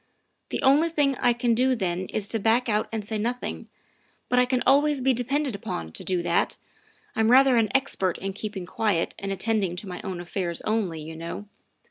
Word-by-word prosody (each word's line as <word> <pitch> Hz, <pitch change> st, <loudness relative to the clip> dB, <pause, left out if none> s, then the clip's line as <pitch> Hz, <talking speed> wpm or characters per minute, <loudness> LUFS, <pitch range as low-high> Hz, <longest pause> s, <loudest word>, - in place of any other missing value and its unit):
The -, -, -3 dB
only 290 Hz, +5 st, +5 dB
thing 290 Hz, -4 st, +1 dB
I 245 Hz, -, +3 dB
can 240 Hz, 0 st, +1 dB
do 255 Hz, +3 st, +3 dB
then 185 Hz, -3 st, -2 dB
is 210 Hz, -2 st, -2 dB
to 225 Hz, -, -1 dB
back 225 Hz, +4 st, +2 dB
out 210 Hz, -1 st, 0 dB
and 220 Hz, -2 st, -3 dB
say 215 Hz, 0 st, -3 dB
nothing, 240 Hz, +3 st, -3 dB, 0.6 s
but 250 Hz, -, +3 dB
I 250 Hz, -, +5 dB
can 250 Hz, 0 st, 0 dB
always 285 Hz, +1 st, +4 dB
be 260 Hz, +1 st, +3 dB
depended 265 Hz, +3 st, -1 dB
upon 85 Hz, -, -5 dB
to -, -, -7 dB
do 180 Hz, -2 st, 0 dB
that -, -, +1 dB, 0.6 s
I'm 220 Hz, 0 st, +2 dB
rather 265 Hz, +1 st, +6 dB
an 225 Hz, -2 st, +3 dB
expert 225 Hz, -9 st, +1 dB
in 195 Hz, +1 st, -4 dB
keeping 205 Hz, -2 st, -5 dB
quiet 200 Hz, -2 st, 0 dB
and 195 Hz, 0 st, -4 dB
attending 195 Hz, -2 st, 0 dB
to 190 Hz, +3 st, -6 dB
my 180 Hz, -1 st, -6 dB
own 190 Hz, -4 st, -5 dB
affairs 175 Hz, -1 st, -3 dB
only, 215 Hz, -7 st, -1 dB
you 160 Hz, +1 st, -8 dB
know. 170 Hz, +5 st, -6 dB
220 Hz, 200 wpm, -26 LUFS, 190-250 Hz, 0.6 s, rather